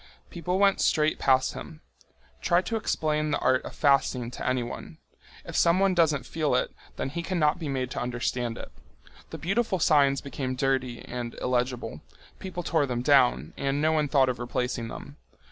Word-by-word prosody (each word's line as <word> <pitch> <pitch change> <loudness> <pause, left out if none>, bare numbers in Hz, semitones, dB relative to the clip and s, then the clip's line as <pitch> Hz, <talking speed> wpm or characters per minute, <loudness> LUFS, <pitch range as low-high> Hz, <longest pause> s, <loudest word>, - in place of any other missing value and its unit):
People 180 +1 -2
went 200 0 +3
straight 155 0 +2
past 130 -1 +3
him. 155 -2 -9 0.6
Try 175 +1 +3
to 230 - -3
explain 155 -7 0
the 145 - +1
art 130 0 +2
of - - -8
fasting 135 -4 +2
to - - -7
anyone! 125 -2 -4 0.5
If - - -7
someone 185 +3 +4
doesn't 160 -5 +2
feel 155 -5 0
it, 125 - 0 0.2
then - - -3
he 170 +5 -4
cannot 170 -2 +1
be 155 -4 -4
made 130 -2 -2
to - - -3
understand 120 -1 -2
it. - - -9 0.6
The - - -7
beautiful 195 +3 0
signs 140 -4 +4
became 135 -2 -4
dirty 130 -2 -1
and 120 -1 -5
illegible. 125 - -2 0.4
People 180 -2 -5
tore 155 -3 +1
them 120 -1 -2
down, 125 - +3
and 140 +1 -1
no 155 +1 +2
one 155 -2 +1
thought 135 -2 +3
of 125 -2 -2
replacing 125 -1 -2
them. - - -9
140 Hz, 175 wpm, -27 LUFS, 125-160 Hz, 0.6 s, someone